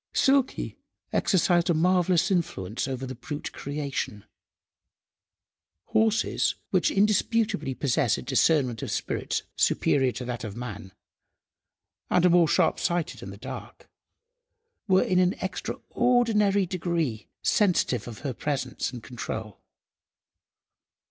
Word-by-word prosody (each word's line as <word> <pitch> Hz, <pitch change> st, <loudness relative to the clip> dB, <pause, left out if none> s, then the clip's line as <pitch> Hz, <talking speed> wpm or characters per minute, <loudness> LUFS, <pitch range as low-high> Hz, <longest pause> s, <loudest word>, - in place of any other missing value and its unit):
Silky 270 Hz, -1 st, +1 dB, 0.3 s
exercised 175 Hz, -2 st, +2 dB
a 170 Hz, -, +3 dB
marvellous 180 Hz, +2 st, +3 dB
influence 115 Hz, -, -1 dB
over 130 Hz, 0 st, -4 dB
the 130 Hz, -, -5 dB
brute 145 Hz, +4 st, -6 dB
creation. 140 Hz, -7 st, -4 dB, 1.6 s
Horses, 220 Hz, 0 st, +2 dB, 0.2 s
which -, -, +3 dB
indisputably 210 Hz, -, +1 dB
possess 135 Hz, -3 st, +1 dB
a -, -, -6 dB
discernment 130 Hz, -9 st, +2 dB
of -, -, -4 dB
spirits -, -, -2 dB
superior 135 Hz, -3 st, +2 dB
to 125 Hz, -, -6 dB
that 120 Hz, -1 st, -4 dB
of 105 Hz, -3 st, -6 dB
man, 110 Hz, -5 st, -7 dB, 1.2 s
and 180 Hz, -, +3 dB
are 180 Hz, -, +5 dB
more 170 Hz, -1 st, +5 dB
sharp–sighted 170 Hz, +2 st, +1 dB
in -, -, -7 dB
the -, -, -9 dB
dark, -, -, -9 dB, 1.0 s
were 190 Hz, -1 st, +4 dB
in 185 Hz, -1 st, +2 dB
an 180 Hz, 0 st, +3 dB
extraordinary 210 Hz, 0 st, +1 dB
degree 170 Hz, -, -2 dB, 0.2 s
sensitive 175 Hz, -, +2 dB
of 115 Hz, -3 st, -8 dB
her 140 Hz, -3 st, -3 dB
presence 130 Hz, -1 st, -2 dB
and 120 Hz, -3 st, -9 dB
control. 110 Hz, -3 st, -6 dB
160 Hz, 115 wpm, -26 LUFS, 125-185 Hz, 1.6 s, are